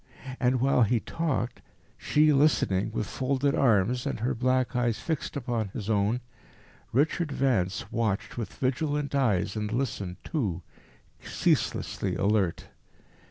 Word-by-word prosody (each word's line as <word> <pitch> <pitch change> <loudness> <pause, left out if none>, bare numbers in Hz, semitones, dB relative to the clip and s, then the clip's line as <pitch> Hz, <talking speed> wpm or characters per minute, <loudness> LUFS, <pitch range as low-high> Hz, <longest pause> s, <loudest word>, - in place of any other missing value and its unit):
And 125 -1 +2
while 130 0 +3
he 115 +1 +3
talked, 145 -3 -2 0.3
she 150 0 +3
listening 135 -9 +2
with - - -2
folded 135 +3 0
arms 120 0 +2
and - - -3
her 125 +3 +1
black 130 +2 +1
eyes 120 -2 +1
fixed 160 -3 -3
upon 120 -5 -2
his 105 +2 -4
own, 105 +4 +1 0.7
Richard 150 +5 +1
Vance 115 -9 0
watched 110 -4 -1
with 115 -5 -4
vigilant 145 +2 -1
eyes 105 -8 +1
and 105 0 -2
listened 105 -7 -2
too, 100 - -2 0.6
ceaselessly 95 -3 0
alert. 100 -3 0
120 Hz, 125 wpm, -28 LUFS, 105-135 Hz, 0.7 s, while